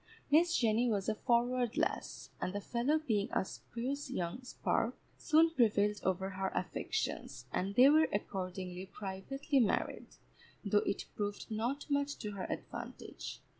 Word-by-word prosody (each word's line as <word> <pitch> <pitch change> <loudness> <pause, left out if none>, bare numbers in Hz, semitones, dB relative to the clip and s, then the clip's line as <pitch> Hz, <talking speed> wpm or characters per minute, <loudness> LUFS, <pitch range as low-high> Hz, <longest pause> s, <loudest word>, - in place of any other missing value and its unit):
Miss 335 +3 +5
Jenny 230 +1 +3
was 200 -3 0
a 220 - +2
forward 245 +1 +1
lass, - - -2
and 185 - -1
the 205 - -1
fellow 245 +8 +1
being 220 -10 0
a - - +1
spruce 260 +8 -5
young 175 +8 -3
spark, 255 - -1 0.2
soon 320 +1 +4
prevailed 210 -6 +3
over 190 +1 0
her 190 0 -2
affections, 160 -6 -2
and 195 +2 -1
they 255 +4 +8
were 310 +2 +6
accordingly 185 -2 -3
privately 265 +11 -2
married, 225 -5 +1 0.6
though 205 +1 +4
it 200 - -1
proved 205 +1 -3
not 240 +6 -1
much 285 0 0
to 210 - -5
her 195 -2 -4
advantage. - - -6
220 Hz, 145 wpm, -34 LUFS, 195-265 Hz, 0.6 s, they